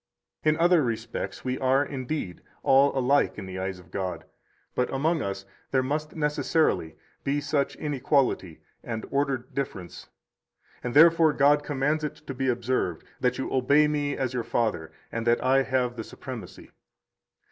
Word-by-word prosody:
In 155 0 +3
other 175 0 +5
respects 115 +1 -4
we 130 0 -1
are, 135 +2 +3
indeed, 135 - -4 0.2
all 135 +1 +5
alike 135 +2 +2
in 100 - -6
the 95 0 -6
eyes 95 0 -3
of 90 -2 -17
God; 95 -1 -4 0.5
but 125 - 0
among 155 +4 +1
us 100 0 -4 0.2
there 130 -1 +2
must 150 +3 -3
necessarily 150 - +1 0.3
be 140 +1 0
such 145 -1 -1
inequality 135 - 0 0.2
and 115 -2 -4
ordered 140 -3 -1
difference, 95 -10 -5 0.7
and 125 +1 -3
therefore 165 0 +7
God 145 +1 +4
commands 145 +2 0
it 150 - -3
to 150 -3 -8
be 135 +1 -2
observed, 120 -8 -1 0.2
that 125 -1 +1
you 135 - -3
obey 140 +4 +4
me 145 -1 -1
as 130 -2 -1
your 125 -2 -1
father, 105 -11 -1 0.2
and 115 +1 -3
that 120 0 +3
I 135 +1 +4
have 125 -2 0
the 115 - -5
supremacy. - - -9
135 Hz, 160 wpm, -27 LUFS, 115-145 Hz, 0.7 s, therefore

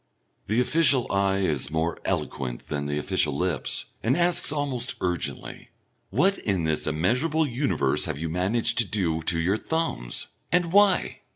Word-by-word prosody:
The 110 +4 +1
official 130 -1 +3
eye 100 0 +1
is 75 -8 0
more 80 +2 -1
eloquent 60 -3 -3
than 70 -1 -2
the 75 0 -2
official 75 -3 0
lips 90 -7 -1 0.2
and 130 +7 +1
asks 175 -3 +3
almost 135 -5 -2
urgently, 90 -5 -4 0.4
"What 185 - +2
in 95 -5 -1
this 80 -1 -1
immeasurable 125 - +1
universe 125 - 0
have - - -3
you 80 +3 -3
managed 110 +8 +1
to 120 - +4
do 85 -6 0
to 85 +1 +1
your 90 +5 +1
thumbs? 160 - -2 0.3
And 175 0 +1
why?" 200 -2 +3
100 Hz, 155 wpm, -25 LUFS, -, 0.4 s, to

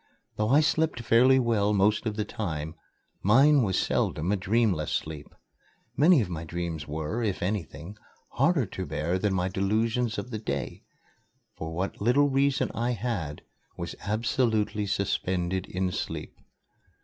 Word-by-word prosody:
Though 105 0 0
I 145 +4 +6
slept 155 -3 +1
fairly 120 +3 +5
well 110 -5 +2
most 105 +3 +2
of 105 - -2
the 105 -1 -2
time, 80 -6 -4 0.5
mine 135 +8 +5
was 95 -5 0
seldom 80 +5 0
a - - +3
dreamless 100 -4 +1
sleep. 75 -2 -3 0.7
Many 155 -1 +5
of 105 - -2
my 85 -2 -5
dreams 85 -2 -4
were, 80 +9 -3
if 105 -6 -1
anything, 90 -1 -4 0.3
harder 160 -8 +2
to 95 -1 -6
bear 85 +4 -1
than 100 -1 0
my 90 0 0
delusions 110 +4 0
of 100 +5 -5
the 110 - -3
day, 70 - -4 0.7
for 80 0 -6
what 90 +5 -4
little 135 +6 +4
reason 140 0 +1
I 120 +2 -1
had 100 -10 -4 0.3
was - - -5
absolutely 110 -1 0
suspended 95 -2 -1
in 95 0 -2
sleep. - - -5
105 Hz, 150 wpm, -27 LUFS, 90-120 Hz, 0.7 s, I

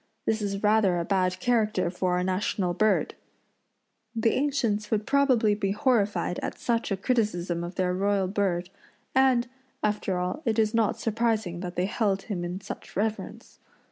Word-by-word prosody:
This 220 0 0
is 200 0 -3
rather 210 -4 +3
a 170 - -1
bad 185 -1 +1
character 215 -6 +1
for 180 0 -1
our 180 0 +1
national 185 -1 0
bird. 215 +4 +2 1.0
The 225 0 +2
ancients 255 -7 0
would 215 -1 0
probably 255 -6 +3
be 200 -1 -1
horrified 205 -7 +1
at - - -4
such 230 -2 -1
a 195 - +1
criticism 185 -7 0
of 175 +1 -6
their 180 -1 0
royal 195 0 +1
bird, 185 -2 -1 0.4
and, 260 -2 +3 0.4
after 210 -3 0
all, 180 +9 -2
it 225 -5 0
is 220 0 +2
not 225 -2 +1
surprising 220 -5 0
that 180 -1 -6
they 180 - +1
held 200 -1 0
him 190 -6 -4
in 180 +2 -4
such 195 - -9
reverence. 215 +2 -3
205 Hz, 165 wpm, -27 LUFS, 185-225 Hz, 1.0 s, rather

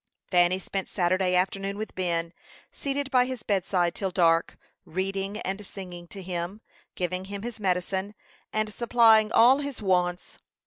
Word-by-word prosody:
Fanny 175 0 +4
spent 190 0 -4
Saturday 185 0 +1
afternoon 195 +2 0
with 215 +1 -5
Ben, 170 -2 -1 0.4
seated 280 0 -3
by 250 -2 +5
his 255 -3 -5
bedside 185 -4 +1
till 195 - -2
dark, 170 -2 +2 0.3
reading 195 +3 -3
and 195 +2 -4
singing 180 -3 -9
to 195 +2 -9
him, 180 +3 -4 0.3
giving 185 +1 -2
him 200 +1 -6
his 240 -1 -6
medicine, 190 +1 -1 0.4
and 215 -1 -1
supplying 225 -2 +5
all 255 +4 +6
his 285 -3 -4
wants. 180 -3 0
195 Hz, 145 wpm, -27 LUFS, 180-215 Hz, 0.4 s, all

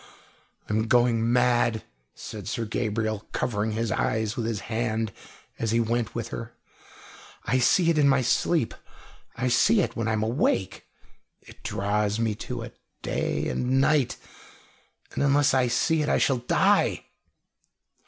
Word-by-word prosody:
"I'm 110 +1 0
going 120 -1 +3
mad," 120 -3 +2 0.3
said 105 -3 -8
Sir 115 +1 -2
Gabriel, 110 -1 -2
covering 110 -3 -1
his 115 0 -2
eyes 110 -1 -1
with 115 -2 -2
his 110 -3 -3
hand 110 -1 -2 0.5
as 115 - -1
he 115 +2 +2
went 115 0 -1
with 115 -1 -4
her. 115 -1 -7 0.9
"I 130 +2 +1
see 170 +7 +4
it 155 - +1
in 140 -1 +5
my 135 -1 +3
sleep, 125 +2 +1 0.6
I 125 - -1
see 200 - +4
it - - -2
when 115 -2 -2
I 110 - +1
am 110 0 0
awake 110 -5 -1 0.5
it - - -17
draws 105 +1 -1
me 115 -2 0
to 105 - -6
it, - - -11 0.2
day - - -1
and 130 +1 0
night 140 -2 +2 1.0
and - - -2
unless 140 0 +3
I 130 -2 +3
see 155 +7 +1
it 150 - -1
I - - +3
shall 135 - +2
die!" 120 - +2
115 Hz, 155 wpm, -26 LUFS, 110-125 Hz, 1.0 s, in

